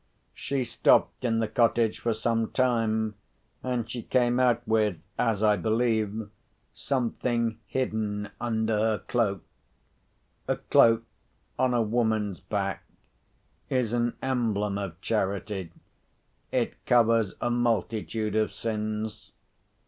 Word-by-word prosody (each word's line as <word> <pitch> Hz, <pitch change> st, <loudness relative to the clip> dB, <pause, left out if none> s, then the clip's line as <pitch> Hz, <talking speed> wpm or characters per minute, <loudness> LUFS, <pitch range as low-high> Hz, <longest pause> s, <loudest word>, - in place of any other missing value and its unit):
She 135 Hz, 0 st, -2 dB
stopped 120 Hz, +1 st, +2 dB
in 115 Hz, -2 st, +1 dB
the 115 Hz, -1 st, +1 dB
cottage 115 Hz, -1 st, +2 dB
for 120 Hz, -, 0 dB
some 115 Hz, 0 st, 0 dB
time, 110 Hz, -4 st, +1 dB, 0.5 s
and 125 Hz, -3 st, -2 dB
she 120 Hz, 0 st, -5 dB
came 120 Hz, +1 st, +2 dB
out 120 Hz, -1 st, +2 dB
with 110 Hz, -4 st, +2 dB, 0.2 s
(as 110 Hz, -3 st, +1 dB
I 105 Hz, -1 st, +4 dB
believe) 110 Hz, -2 st, 0 dB, 0.5 s
something 120 Hz, -3 st, -1 dB
hidden 105 Hz, -4 st, -2 dB
under 110 Hz, -2 st, 0 dB
her 110 Hz, 0 st, +2 dB
cloak. 100 Hz, -7 st, -1 dB, 1.0 s
A -, -, +1 dB
cloak 115 Hz, 0 st, +4 dB, 0.6 s
(on 130 Hz, -1 st, +2 dB
a 120 Hz, -, +3 dB
woman's 110 Hz, -4 st, 0 dB
back) -, -, -3 dB, 0.9 s
is 125 Hz, -4 st, 0 dB
an 120 Hz, 0 st, 0 dB
emblem 105 Hz, -6 st, 0 dB
of 95 Hz, -4 st, -5 dB
charity—it 100 Hz, -3 st, -4 dB
covers 115 Hz, -4 st, +3 dB
a 120 Hz, -, 0 dB
multitude 110 Hz, -3 st, 0 dB
of 110 Hz, 0 st, +2 dB
sins. 110 Hz, -1 st, -4 dB
115 Hz, 110 wpm, -27 LUFS, 105-120 Hz, 1.0 s, I